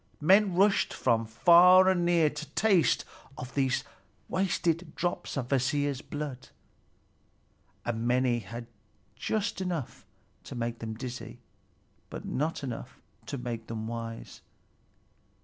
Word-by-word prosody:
Men 190 Hz, +4 st, +4 dB
rushed 195 Hz, +2 st, +3 dB
from 115 Hz, -2 st, +1 dB
far 175 Hz, +10 st, +7 dB
and 185 Hz, -2 st, +3 dB
near 170 Hz, -3 st, +3 dB
to 150 Hz, -1 st, -7 dB
taste 195 Hz, -7 st, +3 dB, 0.3 s
of 125 Hz, +1 st, -7 dB
these 135 Hz, -1 st, +1 dB, 0.4 s
wasted 180 Hz, -2 st, -1 dB
drops 175 Hz, -4 st, -2 dB
of 125 Hz, -3 st, -2 dB
Kvasir's 140 Hz, 0 st, 0 dB
blood, 145 Hz, -5 st, -6 dB, 1.4 s
and 120 Hz, 0 st, -2 dB
many 125 Hz, -1 st, +2 dB
had 115 Hz, +3 st, -8 dB, 0.5 s
just 210 Hz, -, -2 dB
enough 175 Hz, -8 st, -4 dB, 0.4 s
to -, -, -8 dB
make 120 Hz, -1 st, -3 dB
them 110 Hz, -1 st, -5 dB
dizzy, 125 Hz, +1 st, -7 dB, 0.7 s
but -, -, -7 dB
not 150 Hz, +3 st, -2 dB
enough 125 Hz, -4 st, -6 dB, 0.3 s
to 140 Hz, -, -4 dB
make 120 Hz, -2 st, -5 dB
them 110 Hz, -1 st, -5 dB
wise. 115 Hz, 0 st, -6 dB
140 Hz, 120 wpm, -29 LUFS, 120-175 Hz, 1.4 s, far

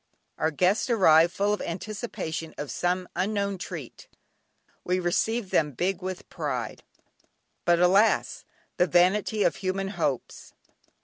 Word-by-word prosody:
Our 160 Hz, -, +2 dB
guests 185 Hz, -, +1 dB
arrived 170 Hz, -7 st, +5 dB
full 205 Hz, +2 st, 0 dB
of 210 Hz, -, -3 dB
anticipation 170 Hz, -4 st, -5 dB
of 145 Hz, -, -5 dB
some 180 Hz, +1 st, -1 dB
unknown 200 Hz, 0 st, -1 dB
treat; 165 Hz, -9 st, -8 dB, 0.8 s
we 180 Hz, +1 st, 0 dB
received 195 Hz, +4 st, 0 dB
them 150 Hz, -2 st, +2 dB
"big 185 Hz, +7 st, -1 dB
with 185 Hz, 0 st, -6 dB
pride." -, -, -4 dB, 0.8 s
But 175 Hz, -1 st, +4 dB
alas! 190 Hz, +5 st, +3 dB, 0.3 s
the 180 Hz, -, +3 dB
vanity 190 Hz, +5 st, +3 dB
of -, -, +1 dB
human 195 Hz, 0 st, -2 dB
hopes. 155 Hz, -, -3 dB
185 Hz, 125 wpm, -26 LUFS, 170-200 Hz, 0.8 s, arrived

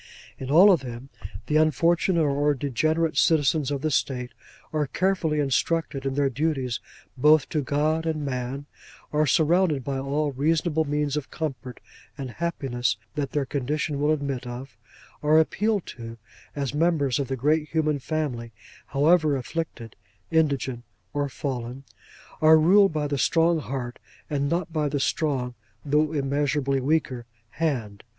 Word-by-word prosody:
In 130 Hz, -, -6 dB
all 180 Hz, +8 st, +8 dB
of 175 Hz, -, +4 dB
them, 125 Hz, +1 st, -8 dB, 0.4 s
the 150 Hz, -, +1 dB
unfortunate 165 Hz, +2 st, +3 dB
or 145 Hz, +1 st, +2 dB
degenerate 155 Hz, +4 st, 0 dB
citizens 145 Hz, 0 st, +3 dB
of 140 Hz, -2 st, -2 dB
the 155 Hz, -, 0 dB
State 125 Hz, -3 st, -1 dB, 0.4 s
are 150 Hz, -2 st, 0 dB
carefully 175 Hz, -3 st, 0 dB
instructed 140 Hz, 0 st, 0 dB
in 135 Hz, -, -2 dB
their 140 Hz, -1 st, +2 dB
duties 135 Hz, -2 st, -1 dB, 0.4 s
both 150 Hz, +2 st, +5 dB
to 155 Hz, -, 0 dB
God 155 Hz, +4 st, 0 dB
and 155 Hz, -2 st, -2 dB
man; 130 Hz, +1 st, -4 dB, 0.5 s
are 150 Hz, 0 st, +2 dB
surrounded 160 Hz, -1 st, +3 dB
by 135 Hz, +1 st, -2 dB
all 145 Hz, +2 st, -1 dB
reasonable 160 Hz, +3 st, +1 dB
means 145 Hz, 0 st, -1 dB
of 150 Hz, -, -4 dB
comfort 130 Hz, -5 st, -5 dB, 0.4 s
and 135 Hz, -3 st, -5 dB
happiness 125 Hz, -, -2 dB, 0.2 s
that 145 Hz, -2 st, -3 dB
their 145 Hz, -2 st, 0 dB
condition 145 Hz, +2 st, -2 dB
will 150 Hz, -, +2 dB
admit 140 Hz, -4 st, -2 dB
of; 125 Hz, +2 st, -8 dB, 0.5 s
are 150 Hz, +1 st, +4 dB
appealed 205 Hz, +5 st, +1 dB
to, 115 Hz, -1 st, -9 dB, 0.4 s
as 140 Hz, -2 st, -2 dB
members 150 Hz, -4 st, +1 dB
of 140 Hz, -, -1 dB
the 135 Hz, -, -2 dB
great 150 Hz, +4 st, +1 dB
human 155 Hz, -3 st, 0 dB
family, 130 Hz, -6 st, -3 dB, 0.4 s
however 150 Hz, +1 st, +3 dB
afflicted, 130 Hz, -4 st, -5 dB, 0.4 s
indigent, 140 Hz, -6 st, +1 dB, 0.3 s
or 145 Hz, -1 st, -1 dB
fallen; 130 Hz, -1 st, -5 dB, 0.6 s
are 160 Hz, 0 st, +7 dB
ruled 195 Hz, +5 st, +5 dB
by 155 Hz, -1 st, -1 dB
the 145 Hz, -1 st, -2 dB
strong 165 Hz, +2 st, +3 dB
Heart, 130 Hz, -4 st, -5 dB, 0.3 s
and 140 Hz, -1 st, 0 dB
not 170 Hz, 0 st, -2 dB
by 150 Hz, -2 st, 0 dB
the 145 Hz, -, -1 dB
strong 135 Hz, -4 st, -1 dB, 0.3 s
(though 150 Hz, +2 st, +2 dB
immeasurably 140 Hz, -1 st, 0 dB
weaker) 130 Hz, -4 st, -1 dB, 0.2 s
Hand. 120 Hz, -11 st, -2 dB
145 Hz, 145 wpm, -25 LUFS, 135-155 Hz, 0.6 s, all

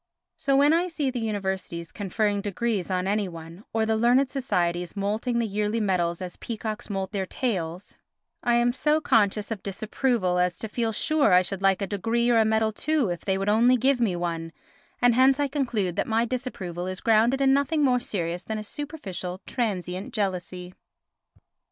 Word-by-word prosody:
So 275 Hz, -1 st, +1 dB
when 290 Hz, +3 st, +5 dB
I 345 Hz, +2 st, +2 dB
see 300 Hz, -6 st, -1 dB
the 250 Hz, -, -3 dB
universities 190 Hz, -6 st, -3 dB
conferring 205 Hz, +1 st, -1 dB
degrees 205 Hz, -1 st, -2 dB
on 185 Hz, -1 st, 0 dB
any 205 Hz, +1 st, 0 dB
one, 165 Hz, +3 st, -10 dB
or 225 Hz, 0 st, +1 dB
the 220 Hz, 0 st, +1 dB
learned 245 Hz, +4 st, +3 dB
societies 180 Hz, -10 st, -1 dB
moulting 215 Hz, +5 st, -1 dB
the 235 Hz, -, +1 dB
yearly 210 Hz, +2 st, -1 dB
medals 180 Hz, -4 st, 0 dB
as 180 Hz, -, -7 dB
peacocks 220 Hz, -2 st, -5 dB
moult 195 Hz, -1 st, -3 dB
their 190 Hz, -2 st, -2 dB
tails, 180 Hz, -8 st, -3 dB, 0.5 s
I 240 Hz, -1 st, +2 dB
am 240 Hz, 0 st, +3 dB
so 300 Hz, +3 st, +2 dB
conscious 210 Hz, -6 st, +2 dB
of 215 Hz, -4 st, -3 dB
disapproval 200 Hz, -1 st, 0 dB
as 180 Hz, -1 st, +1 dB
to 220 Hz, -, -4 dB
feel 225 Hz, +1 st, -1 dB
sure 285 Hz, -, +2 dB
I 180 Hz, +1 st, +6 dB
should 195 Hz, +1 st, -5 dB
like 195 Hz, 0 st, +3 dB
a -, -, +1 dB
degree 230 Hz, +5 st, 0 dB
or 230 Hz, -, +5 dB
a 220 Hz, -, +4 dB
medal 220 Hz, 0 st, +2 dB
too 280 Hz, -, 0 dB
if 175 Hz, -, -3 dB
they 190 Hz, -1 st, 0 dB
would 195 Hz, +1 st, -2 dB
only 235 Hz, +4 st, +5 dB
give 260 Hz, +1 st, +2 dB
me 205 Hz, -6 st, +2 dB
one, 165 Hz, -1 st, -3 dB, 0.5 s
and 245 Hz, -1 st, +6 dB
hence 260 Hz, +3 st, +4 dB
I 290 Hz, -, +2 dB
conclude 240 Hz, -, -1 dB
that -, -, 0 dB
my 225 Hz, +1 st, +2 dB
disapproval 195 Hz, -9 st, -4 dB
is 185 Hz, 0 st, -4 dB
grounded 230 Hz, +4 st, +3 dB
in 270 Hz, -1 st, +4 dB
nothing 285 Hz, +2 st, +2 dB
more 250 Hz, -2 st, +3 dB
serious 175 Hz, -7 st, -3 dB
than 220 Hz, +2 st, -4 dB
a 215 Hz, -, -4 dB
superficial, 200 Hz, -, -6 dB
transient 190 Hz, -6 st, -3 dB
jealousy. 180 Hz, -3 st, -3 dB
215 Hz, 190 wpm, -26 LUFS, 185-245 Hz, 0.5 s, I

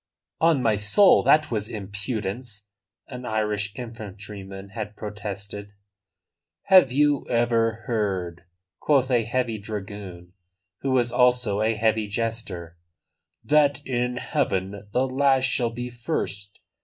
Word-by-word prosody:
"On 160 Hz, -5 st, +3 dB
my 110 Hz, -3 st, +3 dB
soul, 105 Hz, -, +5 dB
that 155 Hz, -2 st, +4 dB
was 105 Hz, -2 st, -2 dB
impudence!" 105 Hz, +1 st, -5 dB, 0.4 s
an 125 Hz, -1 st, -8 dB
Irish 105 Hz, -3 st, -1 dB
infantryman 100 Hz, -4 st, -8 dB
had 105 Hz, 0 st, -6 dB
protested. 105 Hz, -1 st, -7 dB, 0.9 s
"Have 185 Hz, -9 st, +6 dB
you 145 Hz, +1 st, +3 dB
ever 115 Hz, -1 st, +1 dB
heard," 95 Hz, -6 st, -2 dB, 0.3 s
quoth 135 Hz, -3 st, +2 dB
a 120 Hz, -3 st, +3 dB
heavy 120 Hz, -2 st, -1 dB
dragoon, 100 Hz, -4 st, -7 dB, 0.5 s
who 135 Hz, -, -2 dB
was 125 Hz, -2 st, +2 dB
also 125 Hz, -5 st, +2 dB
a 110 Hz, +1 st, +2 dB
heavy 110 Hz, 0 st, +1 dB
jester, 100 Hz, -6 st, -4 dB, 0.6 s
"that 145 Hz, -1 st, +3 dB
in 125 Hz, -1 st, -1 dB
heaven 100 Hz, -3 st, -2 dB
the 125 Hz, +4 st, +2 dB
last 135 Hz, 0 st, +3 dB
shall 125 Hz, -2 st, +1 dB
be 120 Hz, +2 st, -6 dB
first? 110 Hz, -5 st, -3 dB
110 Hz, 120 wpm, -25 LUFS, 100-125 Hz, 0.9 s, Have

